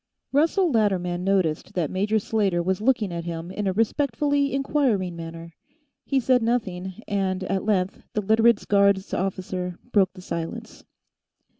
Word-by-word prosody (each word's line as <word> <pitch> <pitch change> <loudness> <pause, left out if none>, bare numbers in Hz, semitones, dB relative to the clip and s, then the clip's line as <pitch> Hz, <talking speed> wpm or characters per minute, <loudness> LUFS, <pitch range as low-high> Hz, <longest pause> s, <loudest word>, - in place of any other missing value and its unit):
Russell 330 +5 +3
Latterman 180 -6 +1
noticed 185 -5 0
that 170 -5 -1
Major 205 +4 +1
Slater 200 -5 0
was 190 +2 -1
looking 220 -6 +1
at 170 0 -4
him 170 +1 -5
in 205 +1 -3
a - - +2
respectfully 280 +6 +1
inquiring 265 - 0
manner. 165 0 -8 0.5
He 275 - +2
said 255 0 +3
nothing, 215 -4 -2
and, 190 -2 -1
at 190 +1 -2
length, 195 -3 0
the 210 - 0
Literates' 220 +2 +3
guards 200 -1 +3
officer 185 -1 -3
broke 195 -4 +3
the 185 - -12
silence. 165 -2 -6
195 Hz, 145 wpm, -24 LUFS, 180-225 Hz, 0.5 s, Russell